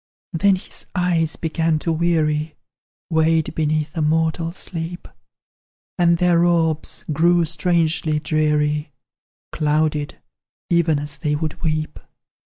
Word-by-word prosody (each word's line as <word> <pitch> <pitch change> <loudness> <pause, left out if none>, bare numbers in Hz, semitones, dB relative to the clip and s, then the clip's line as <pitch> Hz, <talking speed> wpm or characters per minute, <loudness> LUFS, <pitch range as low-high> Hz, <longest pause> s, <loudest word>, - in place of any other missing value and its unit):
Then 195 +4 +3
his 185 - -7
eyes 170 -3 +1
began 160 -1 0
to 165 +2 -2
weary, 155 -2 0 0.6
Weighed 160 -1 +2
beneath 155 -1 -1
a 165 - -1
mortal 160 +2 +1
sleep; 175 -1 -6 0.9
And 170 -1 +4
their 175 -1 +3
orbs 165 -3 0
grew 170 +3 +3
strangely 165 -1 +1
dreary, 150 -1 0 0.6
Clouded, 150 -1 0 0.5
even 170 -3 +3
as 145 0 -5
they 150 -1 0
would 155 0 -4
weep. 155 -2 -2
160 Hz, 110 wpm, -21 LUFS, 155-170 Hz, 0.9 s, And